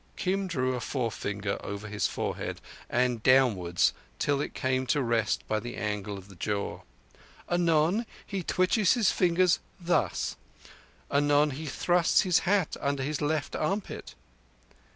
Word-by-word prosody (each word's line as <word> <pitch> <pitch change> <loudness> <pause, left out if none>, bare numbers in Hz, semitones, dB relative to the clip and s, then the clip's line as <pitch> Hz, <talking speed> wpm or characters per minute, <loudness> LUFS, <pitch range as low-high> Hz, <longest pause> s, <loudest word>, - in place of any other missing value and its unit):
(Kim 195 +1 -1
drew 130 -7 0
a 125 - -2
forefinger 105 -5 -3
over 100 +1 -5
his 105 0 0
forehead - - -3 0.3
and 125 -2 +1
downwards 110 -10 +3 0.2
till 145 - +1
it - - -5
came 130 0 0
to 145 - +2
rest 115 -4 0
by 110 - 0
the 120 +2 -6
angle 105 -1 -3
of 95 0 -11
the 100 - -13
jaw.) 100 +2 -3 0.7
"Anon 175 +5 +2 0.2
He 195 -2 -3
twitches 185 +3 +3
his 230 -6 +3
fingers 180 -1 +3 0.2
thus. 175 0 0 0.7
Anon 145 +1 +3
He 150 +4 -6
thrusts 175 +4 +3
his 180 -4 +3
hat 200 -5 +2
under 140 -1 0
his 150 +1 -2
left 150 -1 -1
armpit." 190 - -3
140 Hz, 140 wpm, -28 LUFS, 110-175 Hz, 0.7 s, downwards